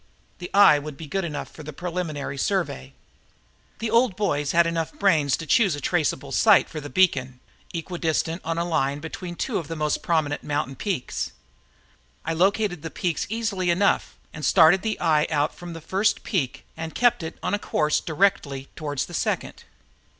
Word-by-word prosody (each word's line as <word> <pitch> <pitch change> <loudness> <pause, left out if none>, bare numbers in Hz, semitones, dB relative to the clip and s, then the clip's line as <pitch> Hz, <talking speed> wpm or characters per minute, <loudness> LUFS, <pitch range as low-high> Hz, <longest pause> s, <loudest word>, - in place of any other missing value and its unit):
The 175 - -6
eye 195 -7 +7
would 145 -1 -8
be 160 - -8
good 195 +6 -2
enough 150 -4 -4
for - - -11
the 155 0 -7
preliminary 165 -3 -4
survey. 135 - -2 0.8
The 225 -1 -3
old 230 -3 +3
boys 145 -9 0
had 170 0 +4
enough 165 -1 -1
brains 155 -9 +3
to 165 - -7
choose 195 +1 +3
a - - -6
traceable 145 -4 -1
site 215 +6 +5
for 155 - -6
the 145 - -7
beacon, 135 -9 +2 0.3
equidistant 165 0 -2
on 165 0 -2
a 170 - 0
line 145 -5 0
between 175 +3 -7
two 235 +6 -1
of 165 - -7
the 165 - -5
most 150 -1 -1
prominent 155 -4 0
mountain 145 -2 -2
peaks. 185 - -3 0.9
I 165 - -1
located 190 0 +1
the 165 - -5
peaks 170 -2 -2
easily 210 -5 -1
enough 185 +4 +1 0.2
and 155 - -8
started 170 +5 +6
the 220 -1 -2
eye 155 -3 +3
out 150 -1 +1
from 175 -1 -9
the 165 - -8
first 195 +6 0
peak 145 - -2
and 160 0 -6
kept 245 -5 +3
it 160 0 -6
on - - -1
a 205 - +1
course 150 -5 +1
directly 150 -6 0
toward 145 -3 -5
the - - -2
second. - - -2
165 Hz, 180 wpm, -24 LUFS, 150-185 Hz, 0.9 s, eye